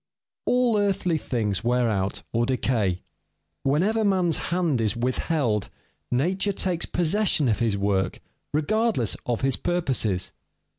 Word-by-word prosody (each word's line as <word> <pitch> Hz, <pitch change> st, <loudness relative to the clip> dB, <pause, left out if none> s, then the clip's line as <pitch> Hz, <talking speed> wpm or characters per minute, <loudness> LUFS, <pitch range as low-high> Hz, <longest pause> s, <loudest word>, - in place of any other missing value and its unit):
_ -, -, -62 dB, 0.4 s
All 245 Hz, -3 st, +3 dB
earthly 195 Hz, -5 st, +1 dB
things 110 Hz, -7 st, -1 dB
wear 120 Hz, 0 st, +2 dB
out 100 Hz, -3 st, -1 dB
or 120 Hz, +1 st, +1 dB
decay. 110 Hz, -8 st, 0 dB, 0.6 s
Whenever 190 Hz, +11 st, +2 dB
man's 185 Hz, -5 st, +2 dB
hand 170 Hz, -8 st, +1 dB
is 110 Hz, +1 st, 0 dB
withheld, 125 Hz, -, 0 dB, 0.4 s
nature 185 Hz, +11 st, +1 dB
takes 180 Hz, -3 st, -1 dB
possession 175 Hz, -3 st, +1 dB
of 110 Hz, -, +1 dB
his 115 Hz, -4 st, +1 dB
work, 95 Hz, -2 st, 0 dB, 0.3 s
regardless 200 Hz, -, +1 dB
of 120 Hz, -2 st, -1 dB
his 135 Hz, -1 st, +1 dB
purposes. 130 Hz, -, 0 dB
135 Hz, 130 wpm, -25 LUFS, 115-180 Hz, 0.6 s, All